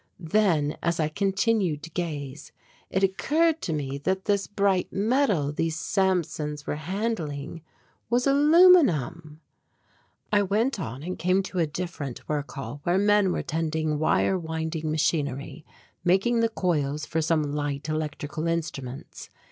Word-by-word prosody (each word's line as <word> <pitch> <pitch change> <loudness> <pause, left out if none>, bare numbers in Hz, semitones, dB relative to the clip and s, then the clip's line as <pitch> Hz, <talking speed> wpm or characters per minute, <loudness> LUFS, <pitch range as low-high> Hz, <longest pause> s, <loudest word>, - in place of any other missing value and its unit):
Then 165 -4 +1
as 170 0 0
I 155 -1 +1
continued 195 -3 0
to 165 - -8
gaze 150 -5 -5 0.4
it 190 - 0
occurred 315 - +2
to - - -3
me 140 -3 -3
that 190 +5 -1
this 200 -1 +1
bright 200 -2 +1
metal 205 - +1
these 165 +1 -1
Samsons 165 -6 -1
were - - -2
handling 165 -4 -3 0.5
was 245 +1 +2
aluminum! 275 - +4 0.9
I 205 -1 +4
went 210 +5 0
on 130 -3 -5
and 180 +2 -5
came 185 +3 +2
to 185 -1 -4
a 165 - +2
different 150 -5 -6
work 150 -1 -2
hall 145 +1 -6
where 175 +4 +1
men 205 -1 +3
were - - -2
tending 155 -2 -1
wire 185 +4 +2
winding 160 -1 -3
machinery, 150 -1 -1 0.4
making 195 +7 +3
the 230 0 +2
coils 150 -8 -1
for 160 - -1
some 155 -2 0
light 145 -1 -3
electrical 155 0 -3
instruments. 140 -6 -4
165 Hz, 140 wpm, -26 LUFS, 150-195 Hz, 0.9 s, aluminum